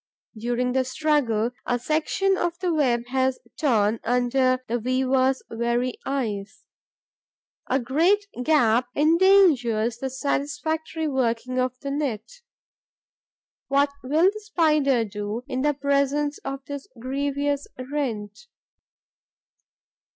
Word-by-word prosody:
During 240 +3 -1
the 260 +1 +2
struggle, 255 -5 +1
a 245 - 0
section 315 +9 0
of 345 -2 -2
the 360 -2 -1
web 245 -6 +1
has 260 0 +1 0.2
torn 225 -6 +2
under 255 +2 +1
the 240 +2 -1
weaver's 260 +2 +1
very 235 +2 -1
eyes. 220 -8 -3 1.1
A 265 - +2
great 330 - +2 0.2
gap 245 -5 +3
endangers 295 - +4
the 265 - -3
satisfactory 305 +4 -2
working 255 -2 -1
of 255 0 -1
the 280 -1 -4
net. 275 -7 -2 1.4
What 280 +1 +2
will 315 +9 +3
the 430 - -7
spider 300 - +2
do 210 +3 -5
in 260 -2 -2
the 295 +1 +1
presence 280 +1 0
of 275 0 -6
this 285 -1 -7
grievous 280 +2 -2
rent? 255 - -4
265 Hz, 110 wpm, -24 LUFS, 240-295 Hz, 1.4 s, endangers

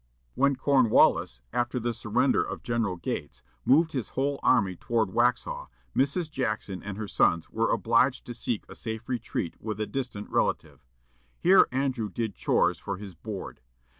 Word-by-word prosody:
When 140 +1 +3
Cornwallis, 130 - +3
after 120 +1 0
the 120 0 -1
surrender 120 +4 +1
of - - -5
General 115 -5 -1
Gates, 85 - -5 0.2
moved 160 +4 +4
his 130 -7 -3
whole 140 +1 0
army 100 -7 +3
toward 110 +1 0
Waxhaw, 120 +4 0 0.3
Mrs. 145 +6 +1
Jackson 110 -8 -2
and 105 -1 -6
her 110 -1 -4
sons 85 -4 +2
were - - +1
obliged 130 -1 +2
to 120 - -6
seek 115 -2 -3
a - - -10
safe 110 0 -6
retreat 120 -9 -3
with 110 -1 -4
a 110 - 0
distant 125 -5 -4
relative. - - -1 0.5
Here 190 +2 +6
Andrew 130 -4 -1
did 110 +2 -3
"chores" - - +1
for 100 - -4
his 100 -1 -9
board. 95 - -7
115 Hz, 160 wpm, -27 LUFS, 105-130 Hz, 0.5 s, Here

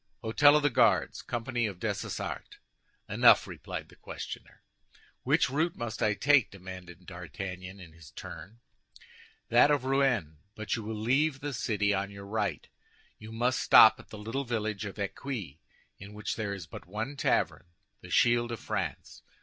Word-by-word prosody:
"Hôtel 145 +6 +5
of 150 - +3
the 145 - +3
Guards, - - +3
company 120 0 -2
of 100 -4 -6
Dessessart." - - -4 0.5
"Enough," - - +6
replied - - -7
the - - -17
questioner. - - -9 0.6
"Which - - +3
route 155 +6 0
must 120 -2 -5
I 105 -1 +2
take?" 140 -3 +4
demanded 90 -1 -10
D'Artagnan, 90 +2 -7
in 85 -4 -12
his 80 -4 -15
turn. 110 - -10 0.9
"That 120 +5 +6
of 145 -3 +1
Rouen; 125 - +1 0.2
but 110 -1 -2
you 115 - -4
will 110 +1 -5
leave 135 +6 +1
the 145 0 -4
city 105 -4 0
on 100 0 -1
your 100 0 -10
right. 100 -7 -2 0.5
You 110 +1 -10
must 120 +3 0
stop 110 0 +7
at - - -15
the 110 - -9
little 115 +7 -3
village 110 -4 -2
of 100 - -7
Eccuis, 100 - -5 0.4
in 100 +2 -11
which 105 0 -3
there 100 -3 -3
is 95 -4 -8
but 80 - -11
one 110 +9 -4
tavern—the 85 -9 -2
Shield 120 0 +3
of 115 - -4
France. - - -4
110 Hz, 160 wpm, -29 LUFS, 95-125 Hz, 0.9 s, stop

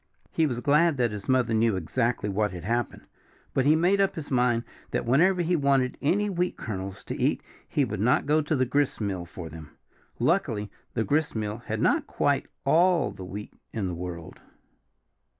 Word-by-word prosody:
He 160 - +2
was 120 -4 -3
glad 150 +2 +3
that 120 -3 +1
his 105 +2 -7
mother 125 -3 +3
knew 110 -1 +3
exactly 115 +5 -1
what 105 +1 0
had 90 -3 -7
happened. 120 +5 -2 0.5
But 130 - +1
he 150 +2 +6
made 180 +5 +3
up 195 - +1
his 150 -3 -7
mind 120 -2 +2 0.3
that - - -2
whenever 175 +9 +3
he 175 +2 +1
wanted 135 -4 +2
any 200 +8 +2
wheat 180 -2 -1
kernels 95 -2 -5
to - - -5
eat - - +1 0.3
he 145 - +2
would 110 -4 -4
not 120 +5 +3
go 150 +2 +3
to 155 +1 -1
the 130 -1 +2
gristmill 110 -9 -1
for 85 0 -8
them. 80 -1 -11 0.4
Luckily 120 - 0 0.2
the 115 - +1
gristmill 110 -7 -1
had - - -2
not - - +2
quite - - 0 0.2
all 175 -1 +4
the 95 - -9
wheat 100 +3 -7 0.2
in 110 -4 -2
the 90 - -3
world. 85 -1 -7
125 Hz, 185 wpm, -27 LUFS, 105-150 Hz, 0.5 s, he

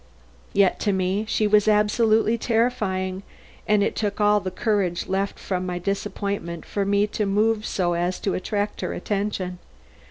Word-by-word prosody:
Yet 195 -2 +3
to 205 - +1
me 190 +3 0
she 215 - +1
was 210 0 +4
absolutely 215 +1 +3
terrifying, 215 -6 0 0.5
and 210 -1 +4
it - - -1
took 205 -1 -2
all 210 0 +4
the 190 -1 -4
courage 185 -2 0
left 195 +1 -1
from 185 -2 -3
my 180 -1 -3
disappointment 195 -2 -3
for 200 -1 -2
me 200 +1 +3
to 210 0 -2
move 215 +2 +1
so 175 -2 0
as 175 +2 -1
to 195 - 0
attract 205 +2 -2
her - - -2
attention. 195 -3 -3
200 Hz, 160 wpm, -24 LUFS, 185-210 Hz, 0.5 s, was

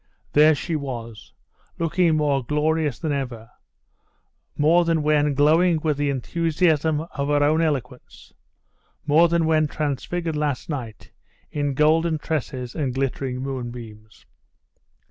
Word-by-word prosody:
There 155 +1 +6
she 145 +5 -3
was! 120 -6 -6 0.5
looking 165 0 +1
more 145 -3 +1
glorious 150 +1 0
than 160 -3 -3
ever; 125 -5 -4 1.1
more 165 +4 +4
than 165 -2 0
when 150 -1 +2
glowing 160 +4 +4
with 155 -3 0
the 145 0 0
enthusiasm 160 +2 0
of 145 -4 -5
her 145 0 +2
own 155 +3 +3
eloquence; 130 -6 -4 0.7
more 155 +3 +5
than 170 -1 +1
when 155 -1 +2
transfigured 155 +3 -3
last 150 -2 -2
night 125 -8 -6 0.4
in 145 -2 -2
golden 160 +2 +3
tresses 135 -5 -4
and 135 -5 -2
glittering 135 -1 -2
moonbeams. 120 -5 -8
150 Hz, 125 wpm, -23 LUFS, 135-160 Hz, 1.1 s, There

